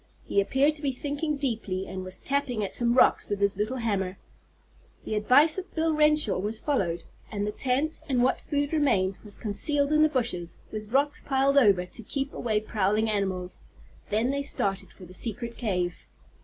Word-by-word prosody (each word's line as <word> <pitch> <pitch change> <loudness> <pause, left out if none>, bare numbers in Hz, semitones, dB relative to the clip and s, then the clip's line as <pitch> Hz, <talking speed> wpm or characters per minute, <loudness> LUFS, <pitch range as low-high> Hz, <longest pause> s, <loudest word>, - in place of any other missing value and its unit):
He 200 - +2
appeared 275 +9 +2
to - - -11
be 280 -3 0
thinking 290 +3 -2
deeply, 220 -8 -2
and 190 -1 -6
was 185 0 -3
tapping 270 -6 -1
at 195 - -4
some 240 0 +2
rocks - - +4
with 205 -1 -1
his 200 0 +2
little 215 +6 -2
hammer. 195 -5 -1 0.9
The - - -3
advice 260 - +4
of 380 - -10
Bill 320 0 +1
Renshaw 300 -9 +3
was 215 +3 -2
followed, 190 - -1 0.3
and 205 -1 -2
the 210 - -2
tent, 270 +7 0
and 250 -3 +2
what 260 - +1
food 285 +1 -2
remained, 195 -11 +2
was 210 -2 -8
concealed 285 +7 +1
in 305 0 +4
the 310 - +5
bushes, 235 - -2
with 215 0 -6
rocks 285 +3 +1
piled 275 0 +2
over 200 -7 +4
to 180 - -6
keep 275 +5 -4
away 215 -3 0
prowling 215 0 +1
animals. 185 -3 -2 0.5
Then 225 +5 +1
they 280 0 -1
started 200 -8 -2
for 185 - -13
the 180 - -13
secret 235 +3 -4
cave. 180 -6 -2
230 Hz, 185 wpm, -27 LUFS, 200-280 Hz, 0.9 s, the